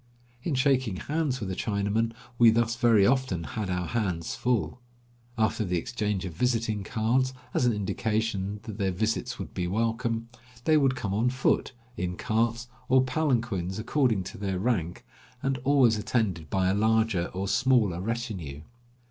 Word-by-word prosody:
In 150 +1 -1
shaking 130 -6 +2
hands 145 - -1
with 100 -5 -4
a - - -3
Chinaman 105 +3 0 0.3
we 120 -1 +8
thus 115 +1 +2
very 115 -5 +4
often 125 -8 +1
had 90 +7 -4
our 90 -1 -1
hands 90 -6 -2
full. 125 0 -1 0.6
After 110 0 +1
the 90 -3 -1
exchange 105 0 -2
of 90 - -5
visiting 115 0 0
cards, 125 +6 0 0.2
as 125 - +2
an 120 - +3
indication 105 -1 -1
that 110 -1 -8
their 95 -1 +1
visits 110 +5 -1
would - - -7
be 90 -1 -2
welcome, 115 +3 -1 0.4
they 155 - +4
would 135 -3 +3
come 105 -6 -3
on 115 +5 +2
foot, 130 +1 +1 0.2
in 90 0 -3
carts, 115 +2 0 0.2
or 130 0 +5
palanquins, 120 - 0
according 115 -3 +1
to - - -9
their 95 -2 -2
rank, 90 -5 -1 0.4
and 135 -1 0
always 130 -4 +4
attended 100 -9 -1
by 95 -1 +1
a - - +2
larger 110 -3 +2
or 95 +2 -4
smaller 110 -5 +2
retinue. 95 - -4
110 Hz, 160 wpm, -27 LUFS, 95-125 Hz, 0.6 s, we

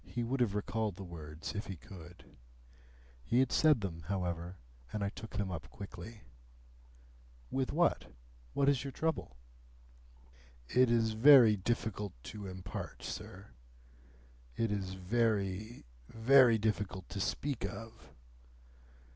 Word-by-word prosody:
He 120 - -3
would 130 +3 -1
have 110 -5 +1
recalled 105 -1 -1
the 95 - -8
words 80 -3 -7
if 105 0 -4
he 95 - -5
could. 85 +1 -13 1.0
He 120 - 0
had 130 -1 +3
said 150 -7 +4
them, 85 -4 -4
however, 90 -2 -3 0.3
and 105 -1 -2
I 100 - 0
took 110 0 -8
them 100 -2 -1
up 85 -2 -6
quickly. 105 +2 -9 1.3
"With 130 -1 0
what? 145 - +1 0.4
What 140 - +2
is 140 -2 +3
your 140 - -4
trouble?" 155 - -2 1.3
"It 125 - +4
is 115 -1 +3
very 120 -2 +8
difficult 105 -1 -2 0.2
to 105 -2 -7
impart, 95 -1 -7
sir. 100 +2 -7 1.1
It 115 -2 +1
is 95 -2 -3
very, 105 +1 -1 0.2
very 120 0 +6
difficult 105 -3 -2
to 100 - -5
speak 130 +4 -2
of. 105 +3 -7
105 Hz, 130 wpm, -33 LUFS, 95-120 Hz, 1.3 s, very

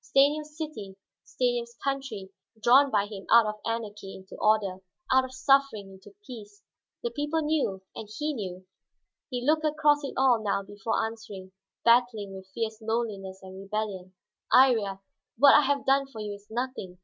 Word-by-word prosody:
Stanief's 295 +3 +2
city, 220 -12 -6 0.3
Stanief's 240 -1 -2
country 270 -9 -3 0.2
this, 220 - -29
drawn 270 +5 +6
by 205 -4 +1
him 205 -2 -9
out 230 -1 +7
of 215 0 -4
anarchy 215 -4 -5
into 190 0 -12
order, 215 -3 +2 0.4
out 260 0 +5
of 260 - -7
suffering 260 -6 +2
into 190 - -16
peace. 210 -4 -11 0.4
The 475 - -2
people 295 0 -1
knew, 285 -11 -1
and 215 - -8
he 300 0 -1
knew. 185 -6 -6 0.6
He 250 -2 -4
looked 310 +2 +2
across 300 -1 +2
it 275 - -5
all 255 -4 +4
now 200 -1 0
before 205 +3 -2
answering, 210 -4 -8 0.3
battling 230 -4 +3
with 190 0 -11
fierce 220 +1 -4
loneliness 210 -4 -3
and 190 0 -10
rebellion. 195 -2 -4 0.4
"Iría, 225 -7 +4 0.4
what 280 +3 +7
I 295 - +7
have 280 -1 0
done 275 0 +3
for 235 -5 -11
you 210 -1 -4
is 200 0 -13
nothing. 235 -6 -4
225 Hz, 165 wpm, -27 LUFS, 200-270 Hz, 0.6 s, out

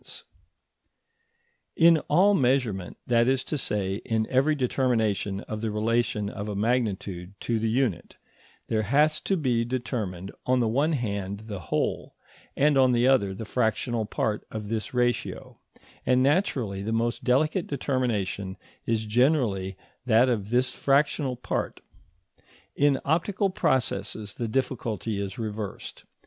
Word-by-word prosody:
ED.] - - -12 1.7
In 165 0 +6
all 190 +7 +5
measurement, 125 - +1
that 120 -1 +3
is 130 0 +2
to 155 - -3
say 100 -8 -1
in 110 -1 0
every 135 +4 +3
determination 115 -7 0
of 110 0 -6
the 115 - -1
relation 110 +1 0
of 100 +1 -5
a 105 - -3
magnitude 100 -5 -1
to 115 -2 0
the 110 +1 0
unit, 120 - -1 0.5
there 110 -1 0
has 150 +8 +3
to 195 - 0
be 125 -7 +1
determined 115 -7 -3 0.2
on 130 0 +3
the 120 - +2
one 140 +8 +1
hand 100 -6 -3
the 105 -4 -6
whole, - - -1 0.4
and 145 -1 +4
on 130 -1 +5
the 120 +1 +3
other 100 -8 +3
the 110 - -6
fractional 115 0 0
part 105 0 -1
of 105 -1 -6
this 110 -2 -3
ratio, 120 -1 -1 0.4
and 130 0 +3
naturally 130 - +1
the 105 +3 -3
most 115 +1 -1
delicate 155 +8 +2
determination 105 -9 -2 0.3
is 110 -1 0
generally 110 - +1 0.3
that 120 +2 +5
of 105 -4 -1
this 125 +2 +2
fractional 140 -1 +1
part. 125 - -3 1.0
In 140 -2 +3
optical 185 +6 +1
processes 110 - -1
the 120 - -3
difficulty 115 -4 -2
is 100 -1 -5
reversed. 105 -3 -6
115 Hz, 140 wpm, -26 LUFS, 105-130 Hz, 1.7 s, In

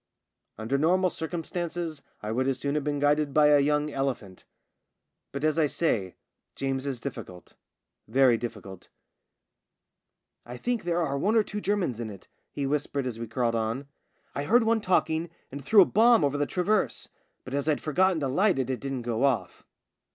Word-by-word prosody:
Under 115 +6 -1
normal 180 +4 +3
circumstances 165 -1 -4 0.2
I 105 - -3
would 130 +3 0
as 135 -2 0
soon 140 +2 -2
have 150 -1 -1
been 145 0 -1
guided 145 0 +1
by 150 -1 +6
a 145 -1 +6
young 150 +1 +1
elephant; 130 -9 -4 0.9
but, 140 +1 -5
as 155 +1 +2
I 155 - +4
say, 110 - -1 0.4
James 135 0 -2
is 135 -3 -3
difficult 115 -9 -8 0.3
— - - -59 0.2
very 130 +1 +4
difficult. 105 -5 -7 0.8
" - - -55
I - - -7
think 240 - -2
there 175 0 +1
are 140 -2 -2
one 210 +9 +1
or 220 - +5
two 210 0 -5
Germans 190 - -1
in 115 -2 -4
it," 100 -2 -12 0.2
he 140 - -3
whispered 140 -1 -1
as 120 -3 -4
we 115 - -5
crawled 120 0 0
on. 115 +5 -2 0.5
"I 140 - -3
heard 235 +8 +4
one 225 0 +2
talking 165 -3 +1 0.2
and 140 +1 -7
threw 200 +7 +7
a - - 0
bomb 225 -4 +4
over 140 0 0
the 145 - +1
traverse, 180 - 0 0.4
but 130 - -8
as 140 +2 -1
I'd 150 - +2
forgotten 180 +2 +1
to 140 - 0
light 185 +8 +2
it 130 -1 -1
it 130 - -3
didn't 135 -3 -4
go 120 +1 -1
off." 135 -4 -1
140 Hz, 190 wpm, -27 LUFS, 130-170 Hz, 0.9 s, threw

